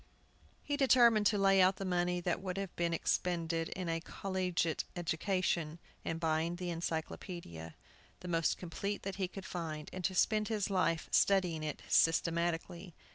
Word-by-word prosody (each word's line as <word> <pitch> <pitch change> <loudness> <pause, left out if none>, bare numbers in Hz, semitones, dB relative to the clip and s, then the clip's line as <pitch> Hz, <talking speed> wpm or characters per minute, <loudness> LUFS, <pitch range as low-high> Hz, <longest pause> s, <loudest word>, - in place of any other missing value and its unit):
He 290 -1 -1
determined 240 -6 +5
to 210 - +2
lay 195 -1 +5
out 185 +1 +5
the 195 - -5
money 180 -1 0
that 175 +1 -1
would 185 -1 -4
have 195 -2 -4
been 170 -1 0
expended 165 -1 0
in 185 -2 -4
a 165 0 -1
collegiate 180 -3 -1
education 170 -1 -1 0.3
in 165 - -2
buying 165 0 0
an 175 -2 -3
Encyclopædia, 160 - -5 0.5
the 180 - -7
most 165 -2 +1
complete 200 +4 -4
that 195 -1 -4
he 190 -2 0
could 190 +1 -9
find, 155 -3 -5
and 185 - -5
to 190 - 0
spend 215 +2 +2
his 210 -3 -1
life 175 -3 +1
studying 180 -5 +3
it 155 -1 -4
systematically. 170 +1 +1
175 Hz, 160 wpm, -34 LUFS, 165-195 Hz, 0.5 s, determined